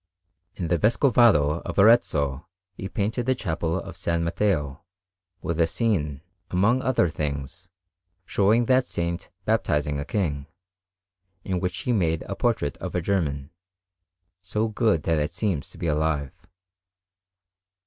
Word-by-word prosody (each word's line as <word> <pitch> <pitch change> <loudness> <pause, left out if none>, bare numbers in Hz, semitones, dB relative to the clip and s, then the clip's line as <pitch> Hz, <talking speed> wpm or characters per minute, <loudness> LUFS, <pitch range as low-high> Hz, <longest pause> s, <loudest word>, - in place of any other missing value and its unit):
In 85 -3 -3
the 85 -1 +2
Vescovado 110 - +4
of - - -6
Arezzo 80 - +3 0.3
he 95 +1 -6
painted 110 +5 -2
the 130 - +3
Chapel 85 -5 -2
of 95 - -8
S. 95 0 -8
Matteo, 85 -3 0 0.6
with 85 0 -1
a 80 - +4
scene, 80 - -1 0.3
among 110 +8 +2
other 130 -9 +2
things, 75 +3 -5 0.6
showing 105 +6 +3
that 130 +1 +3
Saint 85 0 -3 0.2
baptizing 75 -1 0
a - - -2
King, 75 -8 -2 1.0
in 95 -2 -2
which 90 +1 -3
he 125 - 0
made 80 -6 +1
a - - -5
portrait 110 - 0
of - - -6
a 90 - +1
German, 75 -7 -1 0.9
so 105 +4 -1
good 105 - +1
that 80 0 +1
it 75 +3 -2
seems 90 -5 -1
to - - -12
be - - -4
alive. 75 -2 0
85 Hz, 140 wpm, -25 LUFS, 75-105 Hz, 1.0 s, Vescovado